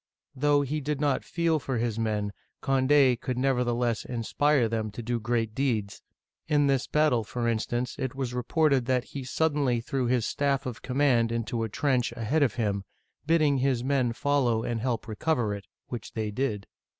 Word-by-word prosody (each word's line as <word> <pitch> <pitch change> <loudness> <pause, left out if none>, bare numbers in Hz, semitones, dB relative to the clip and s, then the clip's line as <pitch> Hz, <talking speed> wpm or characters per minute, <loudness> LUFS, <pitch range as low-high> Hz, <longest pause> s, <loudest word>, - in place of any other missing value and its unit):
'* - - -48
Though 145 -1 +4
he 150 +3 -2
did 145 0 -2
not 145 -2 +1
feel 165 -2 0
for 130 -2 -3
his 115 -1 -1
men, 105 -2 -1 0.3
Cond6 135 -2 +4
could 125 -1 -3
never 130 -1 +2
theless 120 -2 0
inspire 125 +2 +1
them 110 -1 -2
to 110 +3 -7
do 120 +1 -1
great 115 -1 -1
deeds; 110 -7 -1 0.5
in 145 -2 +3
this 135 -2 +1
battle, 150 -7 +2
for 120 +2 -3
instance, 120 +2 -1
it 130 -2 -3
was 130 -3 -3
reported 130 +1 +1
that 130 -2 +2
he 135 0 -7
suddenly 140 -3 +1
threw 125 +2 -2
his 120 -2 +1
staff 140 -1 0
of 125 -4 -5
command 125 -4 +2
into 115 0 -2
a 110 - -2
trench 125 +1 +1
ahead 120 +7 0
of 125 -5 +2
him, 100 -4 -1 0.4
bidding 155 -4 +3
his 130 -2 +1
men 130 -3 +1
follow 120 -3 +1
and 115 -2 -2
help 120 -2 -2
recover 115 -1 0
it, 100 -1 -8 0.2
which 120 - -6
they 110 -2 -2
did. 105 -3 -2
125 Hz, 185 wpm, -27 LUFS, 115-140 Hz, 0.5 s, Though